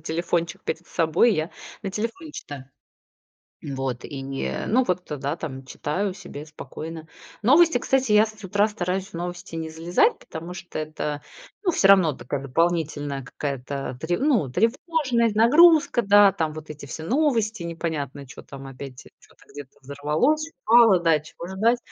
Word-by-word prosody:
телефончик 170 +1 -2
перед 165 +2 -4
собой, 170 +7 +3
я 155 +2 -2 0.3
на 195 - -3
телефоне 230 - -4
читаю. 140 - -8 1.0
Вот, 135 -3 -4
и 140 -2 -6
не, 135 0 -4
ну 255 +4 +3
вот, 180 -2 -1
да 140 +3 -2
там, 135 -5 -6
читаю 185 +9 -2
себе 180 -6 -9
спокойно. 160 +2 -8 0.3
Новости, 300 +4 +5
кстати, 260 -3 +1
я 210 +1 +6
с 215 -1 -12
утра 205 +3 +2
стараюсь, 190 -2 -3
в - - -23
новости 175 0 -6
не 160 -1 -4
залезать, 175 - +2
потому 165 +2 -8
что 175 -2 -7
это, 150 -1 -4 0.4
ну, 360 - +3
все 195 - +3
равно 185 -6 +6
такая 135 +2 -5
дополнительная 145 -1 -1
какая-то 135 0 -5
тре 175 +3 -1
ну, 255 - +2
тревожность, 235 - +1
нагрузка. 295 +4 +6
Да, 205 -1 +6
там 160 -3 -2
вот 155 0 -9
эти 150 -1 -8
все 140 +4 -7
новости, 225 - +1
непонятно, 155 -5 -4
чё 130 - -11
там 135 -1 -10
опять, 135 -1 -9 0.2
чё-то - - -22
где-то 145 -2 -11
взорвалось, 150 - 0
упало, 225 -5 +6
да, 165 -2 +3
чего 160 +3 -10
ждать. 225 +6 +2
170 Hz, 155 wpm, -24 LUFS, 145-220 Hz, 1.0 s, я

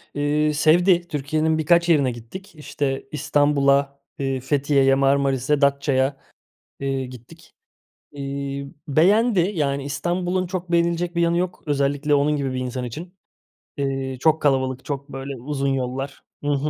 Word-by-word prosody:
Iıı, 150 +1 +1
sevdi, 175 +4 +4
Türkiye'nin 155 +2 0
birkaç 170 +2 +3
yerine 140 -6 +4
gittik. 155 - -10
İşte, 140 -3 -3
İstanbul'a, 140 -1 +2 0.2
eee, 135 -1 -1
Fethiye'ye, 135 -1 +2
Marmaris'e, 140 +1 +2
Datça'ya, 140 -1 +2 0.6
eee, 135 -1 -2
gittik. 130 +6 -14 0.6
Iıı, 140 0 -5 0.2
beğendi. 195 - +3
Yani 140 -4 -1
İstanbul'un 175 +5 -1
çok 180 -1 -5
beğenilecek 170 +1 +1
bir 170 - +2
yanı 170 0 +2
yok. 180 0 -3
Özellikle 145 0 0
onun 145 +1 +3
gibi 135 -2 -2
bir 130 - -2
insan 125 0 -4
için. 170 +10 -8 0.6
İii, 135 -2 -2
çok 160 +2 +3
kalabalık, 130 -2 +1
çok, 140 0 -5
böyle, 135 +1 -6
uzun 140 0 -2
yollar 135 +1 -3 0.2
Hı 145 - -1
hı. 145 +2 0
140 Hz, 135 wpm, -22 LUFS, 135-160 Hz, 0.6 s, sevdi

